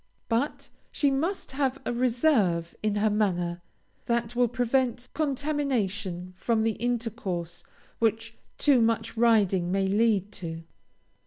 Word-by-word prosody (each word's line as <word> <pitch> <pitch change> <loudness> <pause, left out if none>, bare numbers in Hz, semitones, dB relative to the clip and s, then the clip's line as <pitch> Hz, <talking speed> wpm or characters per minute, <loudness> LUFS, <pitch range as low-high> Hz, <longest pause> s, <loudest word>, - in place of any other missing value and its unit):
But 240 +6 -1 0.2
she 285 -2 +2
must 325 +8 -2
have 270 -1 0
a - - -1
reserve 235 - +2
in 215 -1 0
her 210 +1 +2
manner, 175 -5 0 0.5
that 235 0 0
will 245 0 +3
prevent 245 +1 0
contamination 245 - -1
from 225 +2 +1
the 225 - +2
intercourse 220 -7 -3 0.4
which 225 0 0 0.2
too 275 -5 +4
much 225 0 0
riding 205 -6 +3
may 195 0 +1
lead 205 0 +2
to. 165 -3 -6
225 Hz, 125 wpm, -27 LUFS, 195-245 Hz, 0.5 s, too